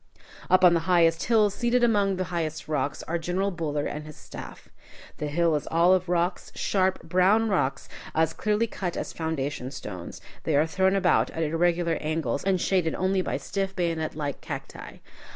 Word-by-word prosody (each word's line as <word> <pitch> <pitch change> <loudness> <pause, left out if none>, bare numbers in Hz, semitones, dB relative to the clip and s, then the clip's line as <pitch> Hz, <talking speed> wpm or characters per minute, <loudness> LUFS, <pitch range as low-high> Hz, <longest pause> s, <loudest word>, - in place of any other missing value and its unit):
Up 185 0 +4
on 175 - +7
the 170 - +3
highest 165 -2 +4
hill, 215 -3 +4
seated 240 +3 +1
among 205 -4 +3
the 185 - -1
highest 160 -2 -3
rocks, 145 -2 -2
are 170 +1 -2
General 185 +4 -1
Buller 150 -4 -2
and 150 +1 -5
his 155 - -10
staff. - - -10 0.5
The 150 - -2
hill 165 +2 +2
is 150 - -3
all 170 +3 +4
of 185 -1 0
rocks, 175 +1 0
sharp, 190 -1 0
brown 190 +6 +3
rocks, 135 -9 0 0.3
as 160 0 +2
clearly 215 +1 +1
cut 185 -5 -4
as - - -4
foundation 145 -5 -3
stones. 95 -10 -8 0.2
They 155 - 0
are 150 +2 +4
thrown 190 +3 +2
about 185 -2 +3
at 165 - -3
irregular 170 +1 +1
angles, 155 -4 -1
and 195 0 +2
are 180 - -2
shaded 180 -4 +1
only 190 0 +1
by - - -2
stiff 195 -1 -3
bayonet 165 -3 -1
like 145 -3 -4
cacti. - - -7
170 Hz, 185 wpm, -26 LUFS, 155-190 Hz, 0.5 s, on